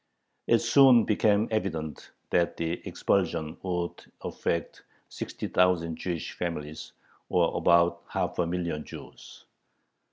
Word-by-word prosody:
It 115 - +5
soon 125 0 +7
became 105 0 +2
evident 80 -8 -3 0.2
that 85 -1 +1
the 85 +1 -2
expulsion 85 -5 0
would 90 -2 -3 0.2
affect 85 -2 -3 0.3
60,000 90 -3 0
Jewish 85 0 -4
families, 80 -3 -5 0.4
or - - +2
about 85 0 +3
half - - -2
a 85 - +2
million 85 -3 -2
Jews. - - -12
85 Hz, 105 wpm, -28 LUFS, 85-100 Hz, 0.4 s, soon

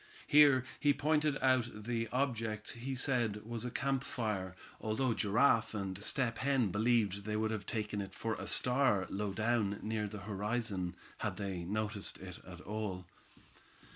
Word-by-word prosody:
Here 145 -4 +7 0.2
he 145 -2 +4
pointed 150 0 +2
out 130 -2 +4
the 115 0 -1
object 115 -5 -1
he 130 +3 -4
said 120 -6 +1
was 115 0 -3
a 125 - -2
campfire, 115 -8 -2 0.2
although 115 +3 0
Giraffe 115 +2 +3
and 100 -1 -4
Step 115 -2 0
Hen 130 -7 +2
believed 105 -2 +2
they 105 +1 -2
would 110 0 0
have 105 -3 -4
taken 105 -2 -2
it 95 0 -7
for 115 -1 -2
a - - -5
star 125 -6 +2
low 100 +1 -1
down 110 -1 +1
near 110 -1 -1
the 105 0 -7
horizon, 105 -3 -2 0.2
had 90 - -2
they 95 -4 -3
noticed 105 +1 -2
it 90 -2 -9
at 90 -1 -9
all. 100 -3 -4
110 Hz, 155 wpm, -34 LUFS, 100-125 Hz, 0.2 s, Here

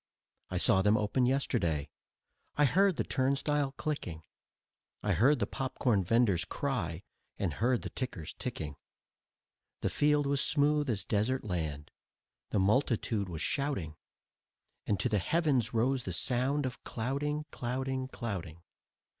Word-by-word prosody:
I - - -2
saw 95 - +4
them 105 +2 +4
open 115 +4 +1
yesterday, 105 - 0 0.6
I 145 - +4
heard 190 +6 +4
the - - 0
turnstile 140 +1 0
clicking; 135 - -4 0.8
I 105 - +2
heard 130 - +4
the - - 0
popcorn 125 -6 0
venders' 100 -3 +3
cry 90 - -2 0.3
and 90 -6 -1
heard 120 - +1
the - - -5
tickers 105 - -5
ticking. 75 -2 -4 1.0
The - - 0
field 150 0 +3
was 140 0 +1
smooth 150 -1 +2
as 100 -3 -1
desert 115 +5 +1
land, 80 -7 -3 0.6
the - - 0
multitude 105 -1 +1
was 80 -3 -4
shouting, 140 - -1 0.9
And 100 - +1
to - - +1
the 105 -4 +2
heavens 135 - +1
rose 125 +3 +1
the 95 - -4
sound 130 - +1
of 125 -1 -5
clouting, 145 +6 -2
clouting, 130 +1 -2
clouting. 90 -10 -5
125 Hz, 135 wpm, -31 LUFS, 95-140 Hz, 1.0 s, saw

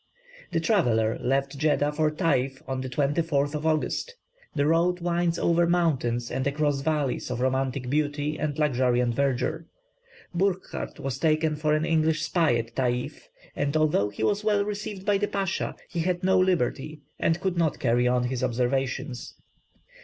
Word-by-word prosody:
The 165 - +1
traveller 120 - +2
left 135 +2 0
Jeddah 150 -1 +2
for 155 +1 +1
Tayf 135 -5 0
on 130 -1 -2
the 130 - -5
24th 145 +1 0
of 150 +1 -2
August. 160 - -1 0.4
The 140 -1 +2
road 170 +3 +2
winds 170 -1 0
over 170 0 +2
mountains 135 -9 +1
and 130 +1 -1
across 145 -1 0
valleys 150 -4 -1
of 125 -1 -3
romantic 130 0 0
beauty 145 +2 0
and 150 -2 -2
luxuriant 125 -4 +2
verdure. 140 +5 -1 0.7
Burckhardt 190 +1 -2
was 135 -1 -4
taken 155 -1 +2
for 150 0 +1
an 155 +1 0
English 160 -1 +1
spy 165 -8 +2
at 115 0 -3
Tayf, 125 -1 -2 0.3
and, 145 +2 0
although 150 -10 +2
he 105 +2 -5
was 205 - +1
well 205 -1 +2
received 205 -2 -5
by 205 -2 +2
the 205 - 0
Pasha, 195 -2 -2
he 170 - -4
had 180 +2 -1
no 190 0 +4
liberty, 155 -4 0 0.2
and 165 +1 +1
could 190 -1 -1
not 160 -4 +1
carry 120 0 +2
on 125 0 +2
his 125 0 -2
observations. 130 +1 -2
150 Hz, 160 wpm, -26 LUFS, 130-170 Hz, 0.7 s, no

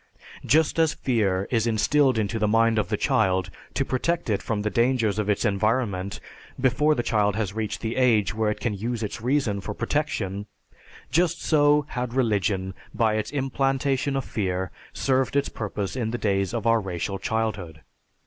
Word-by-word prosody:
Just 160 +2 +2
as 160 -2 +3
fear 100 -6 0
is 115 -2 +2
instilled 130 +4 +3
into 110 +1 -1
the 105 - +2
mind 115 +1 +3
of 100 - -1
the - - 0
child 95 -1 +1 0.2
to - - +1
protect 165 +1 -1
it 100 - 0
from 105 -2 -2
the 105 - -1
dangers 115 -4 +1
of 105 -1 -1
its 105 - +1
environment 100 -2 0 0.4
before 140 +4 +3
the 120 - -1
child 105 -3 +1
has 105 -3 -2
reached 110 -1 -3
the 115 +1 -3
age 110 -7 +3
when 110 -1 0
it - - -5
can 120 -3 -1
use 115 +3 -3
its 110 +2 -5
reason 125 -5 0
for 105 +1 -5
protection, 105 -10 -2 0.6
just 170 0 +1
so 150 -1 +4
had 125 -1 -4
religion, 100 -6 0 0.2
by 110 -2 +2
its 110 0 -1
implantation 135 0 0
of 135 - -1
fear, 95 -3 -2 0.2
served 135 0 0
its 140 0 +2
purpose 105 -2 -4
in 120 -4 -1
the 120 - -2
days 100 -4 0
of 115 -1 -3
our 115 -1 +4
racial 95 +1 -3
childhood. 100 -7 -2
110 Hz, 175 wpm, -25 LUFS, 100-130 Hz, 0.6 s, so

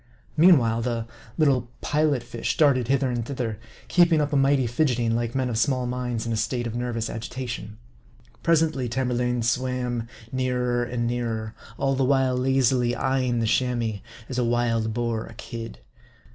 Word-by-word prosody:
Meanwhile, 135 -9 +5
the 115 -1 -2 0.3
little 135 -6 +2
Pilot 150 -4 +1
fish 115 - -3
darted 135 -6 +4
hither 135 0 +2
and 120 -1 -1
thither; 115 -4 -4 0.3
keeping 170 -3 +4
up 150 0 0
a - - +2
mighty 135 -1 +3
fidget 125 +2 +1
ing, 115 -1 +1
like 120 +1 -2
men 130 -1 +1
of 115 -3 -1
small 130 0 +1
minds 125 -2 -3
in 115 - -1
a - - -1
state 120 +2 -1
of 115 - -3
nervous 120 -2 -2
agitation. 115 -2 -6 0.6
Presently, 155 -6 +2
Tamerlane 125 -1 0
swam 125 -1 -1 0.2
nearer 125 -2 0
and 120 0 -2
nearer, 115 -2 -2 0.2
all 135 0 +1
the 135 0 +1
while 130 -1 +2
lazily 125 -1 +2
eyeing 130 -3 0
the - - +1
Chamois, 120 -3 0 0.3
as 125 -1 -3
a - - +2
wild 115 -2 +1
boar 115 -1 -2
a 115 - -12
kid. 115 -1 -7
125 Hz, 165 wpm, -25 LUFS, 115-130 Hz, 0.6 s, Meanwhile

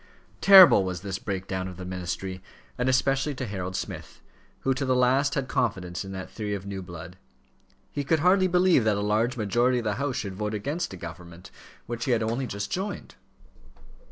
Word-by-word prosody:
Terrible 190 - +9
was 90 -2 -4
this 95 -2 -4
break 95 -2 -4
down 95 -1 -3
of 90 -2 -9
the 90 - -7
ministry, 95 +1 -5 0.3
and 125 +1 0
especially 135 +2 +1
to 130 - -4
Harold 95 -3 -5
Smith, 95 - -6 0.4
who 135 - +1
to 135 +2 -3
the 130 -1 +1
last 130 +3 +2
had 140 - 0
had - - -12
confidence 95 -10 -2
in 95 - -8
that 95 -1 -6
theory 105 -2 -4
of 100 -1 -7
new 100 -1 -5
blood. 90 0 -10 0.7
He 145 - -3
could 155 +2 +1
hardly 185 +2 +4
believe 180 -6 +4
that 110 -2 +2
a - - -1
large 110 +5 0
majority 120 +4 +2
of 120 - -2
the 105 -1 -1
House 140 -3 -1
should 100 -2 -4
vote 105 +2 -3
against 145 - -3
a - - -7
government 85 +1 -10 0.3
which 120 0 -4
he 130 - +2
had 115 -1 +1
only 120 +4 -2
just 100 -1 -5
joined. 195 0 -4
110 Hz, 205 wpm, -26 LUFS, 95-135 Hz, 0.7 s, Terrible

